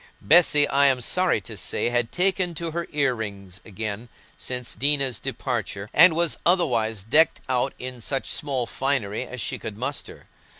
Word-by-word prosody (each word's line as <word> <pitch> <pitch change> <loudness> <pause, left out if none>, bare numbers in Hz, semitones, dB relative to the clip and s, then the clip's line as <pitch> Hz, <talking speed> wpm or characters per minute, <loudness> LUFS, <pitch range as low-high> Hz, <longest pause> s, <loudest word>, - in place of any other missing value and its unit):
Bessy, 150 -3 +5
I 140 0 +4
am 130 -2 +2
sorry 180 +5 +1
to - - -8
say, - - -2
had 120 -1 0
taken 180 -1 0
to 165 +1 -4
her 170 +1 -4
ear 140 -3 +1
rings 100 -4 -7
again 110 +2 -6 0.3
since 125 -1 -3
Dinah's 140 -5 +1
departure, 100 +1 -4
and 170 -2 +7
was 170 -1 +2
otherwise 115 - +1
decked 150 +10 +3
out 125 -1 -1
in 125 -1 -7
such 135 +4 -1
small 135 -4 -1
finery 130 -5 -2
as 125 - -8
she 100 - -4
could 105 -2 -7
muster. 135 +4 -5
130 Hz, 165 wpm, -24 LUFS, 110-150 Hz, 0.3 s, and